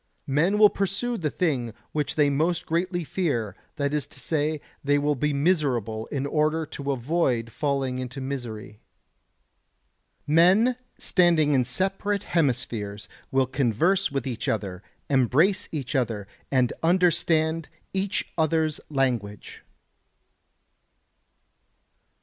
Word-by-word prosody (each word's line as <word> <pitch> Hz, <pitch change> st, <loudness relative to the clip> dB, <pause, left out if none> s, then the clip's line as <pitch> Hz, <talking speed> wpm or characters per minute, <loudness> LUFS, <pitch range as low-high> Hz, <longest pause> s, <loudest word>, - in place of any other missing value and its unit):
Men 160 Hz, +9 st, +2 dB
will 210 Hz, -1 st, +7 dB
pursue 200 Hz, +5 st, -1 dB
the 160 Hz, -8 st, -1 dB
thing 130 Hz, -10 st, -1 dB, 0.2 s
which 150 Hz, -1 st, -2 dB
they 145 Hz, -2 st, +3 dB
most 160 Hz, +5 st, 0 dB
greatly 175 Hz, +2 st, -1 dB
fear; 120 Hz, -, -1 dB, 0.2 s
that 140 Hz, -2 st, -1 dB
is 150 Hz, -1 st, -1 dB
to -, -, -11 dB
say, 155 Hz, -1 st, -1 dB, 0.2 s
they 145 Hz, +1 st, +3 dB
will 145 Hz, +1 st, +1 dB
be 150 Hz, +2 st, 0 dB
miserable 140 Hz, -, 0 dB
in 140 Hz, -1 st, -3 dB
order 155 Hz, +2 st, +1 dB
to 140 Hz, -2 st, -4 dB
avoid 125 Hz, -3 st, 0 dB
falling 135 Hz, -1 st, -1 dB
into 130 Hz, +1 st, -5 dB
misery. 120 Hz, -6 st, -6 dB, 1.5 s
Men 185 Hz, +11 st, +5 dB, 0.2 s
standing 170 Hz, -5 st, +3 dB
in 130 Hz, -2 st, +4 dB
separate 195 Hz, +9 st, -1 dB
hemispheres 120 Hz, -, -1 dB, 0.2 s
will 135 Hz, 0 st, +2 dB
converse 140 Hz, -, +1 dB
with 135 Hz, -3 st, -2 dB
each 120 Hz, -4 st, -4 dB
other, 95 Hz, -4 st, -2 dB, 0.3 s
embrace 140 Hz, -, +2 dB
each 140 Hz, -3 st, -4 dB
other, 115 Hz, -7 st, -1 dB, 0.2 s
and 130 Hz, -3 st, +2 dB
understand 165 Hz, -2 st, +2 dB, 0.2 s
each 195 Hz, 0 st, -1 dB
other's 160 Hz, -1 st, +1 dB
language. 120 Hz, -8 st, -2 dB
145 Hz, 115 wpm, -25 LUFS, 125-170 Hz, 1.5 s, will